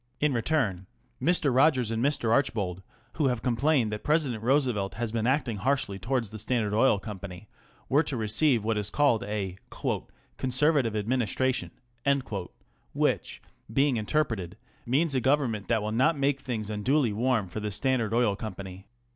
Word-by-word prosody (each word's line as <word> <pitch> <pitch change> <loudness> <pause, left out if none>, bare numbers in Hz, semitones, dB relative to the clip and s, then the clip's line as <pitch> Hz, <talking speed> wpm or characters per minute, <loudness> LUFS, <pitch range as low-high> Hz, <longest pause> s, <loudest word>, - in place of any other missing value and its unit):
In 150 -2 +2
return 115 - 0 0.3
Mr. 150 -2 +2
Rogers 130 -4 +3
and 115 +1 -1
Mr. 140 -5 +1
Archbold, 100 -8 0 0.4
who 150 -3 +2
have 125 -3 -1
complained 125 -1 +2
that 105 - -5
President 145 -8 +1
Roosevelt 120 -6 +1
has 115 0 -2
been 115 0 -1
acting 130 -5 +1
harshly 125 -4 -1
towards 120 0 -1
the 110 - -7
Standard 110 -2 0
Oil 110 0 +4
Company, 100 -1 -8 0.4
were 145 +3 +4
to 145 -4 -3
receive 115 +3 +2
what 110 -1 0
is 105 -1 -2
called 140 -3 +2
a 100 -3 -3 0.5
" - - -33
Conservative 130 -2 +2
Administra 125 +3 0
tion," 130 - -4 1.2
which, - - -1 0.3
being 135 +1 +2
interpreted, 110 - -1 0.3
means 145 +5 +2
a 130 - +1
Government 130 -6 +1
that 115 -3 +1
will 105 - -2
not 130 +8 +2
make 140 0 +1
things 110 -5 -4
unduly 120 +3 +1
warm 115 -2 +1
for 90 +5 -5
the 105 0 -3
Standard 120 +1 0
Oil 115 -3 +2
Company. 95 -2 -8
115 Hz, 160 wpm, -28 LUFS, 105-135 Hz, 1.2 s, Oil